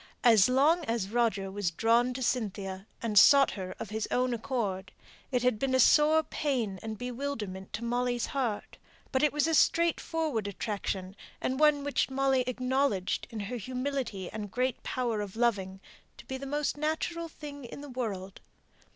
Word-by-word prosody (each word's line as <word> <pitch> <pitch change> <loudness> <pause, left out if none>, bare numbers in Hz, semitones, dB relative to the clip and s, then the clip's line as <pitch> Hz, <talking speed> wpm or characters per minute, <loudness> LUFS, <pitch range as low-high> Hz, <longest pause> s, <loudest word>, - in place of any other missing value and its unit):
As 225 -4 +6
long 300 +7 +4
as 225 -4 -2
Roger 220 -5 +1
was 200 -2 -1
drawn 230 +8 +2
to 260 - -3
Cynthia, 200 -5 -2 0.2
and 210 -3 +5
sought 280 -1 +7
her 185 -2 -6
of 210 - -7
his 220 0 -2
own 250 0 +1
accord, 215 -7 -3 0.4
it 250 -2 +1
had 250 -4 +2
been 265 -1 +1
a - - +3
sore 305 +4 +5
pain 245 -12 -2
and 220 -1 -5
bewilderment 235 -7 -5
to 225 - -4
Molly's 245 0 0
heart; 245 -7 -3 0.3
but 260 - +1
it 300 - +4
was 295 0 +1
a 325 - +1
straightforward 320 -8 +1
attraction, 200 -1 -4 0.2
and 260 +1 -2
one 300 -2 +4
which 285 -1 0
Molly 265 -1 +2
acknowledged, 255 -6 0
in 225 -3 -5
her 230 +5 -4
humility 255 -4 -3
and 210 -1 -5
great 250 +3 -1
power 235 -4 -2
of 205 -1 -6
loving, 200 -5 0 0.4
to - - -13
be 265 - -5
the 275 +1 -7
most 295 +1 -1
natural 320 +2 -2
thing 290 -2 -9
in 260 - -9
the 290 - -8
world. 200 -7 -5
245 Hz, 170 wpm, -30 LUFS, 205-275 Hz, 0.4 s, sought